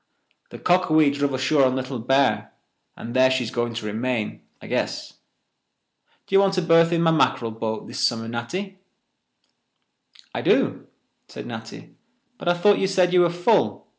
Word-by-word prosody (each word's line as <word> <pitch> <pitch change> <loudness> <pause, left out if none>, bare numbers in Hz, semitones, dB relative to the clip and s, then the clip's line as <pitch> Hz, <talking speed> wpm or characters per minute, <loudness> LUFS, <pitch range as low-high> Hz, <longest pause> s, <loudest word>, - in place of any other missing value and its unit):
The - - -10
Cockawee 155 -5 +3
druv 140 -1 -1
ashore 140 +2 +2
on 130 -1 +2
Little 130 -1 -4
Bear, 115 -4 +1 0.4
and 115 - -8
there 130 0 +5
she's 130 -3 -1
going 120 -1 -2
to 115 - -5
remain, 110 +1 -3 0.2
I - - -13
guess. - - -3 1.1
D'ye 195 - +3
want 195 -1 +2
a 185 - +1
berth 165 0 +4
in 170 -1 +1
my 165 - +4
mackerel 120 -7 +1
boat 110 0 -5
this - - -7
summer, 115 -1 0
Natty?" 185 +13 -5 1.5
"I - - -3
do," - - +1 0.4
said - - -9
Natty, - - -9 0.5
"but - - -8
I 175 - +3
thought 200 +4 +3
you 190 - +1
said 185 -2 +1
you 180 - +5
were 175 - +3
full." 175 +6 0
140 Hz, 165 wpm, -23 LUFS, 120-175 Hz, 1.5 s, there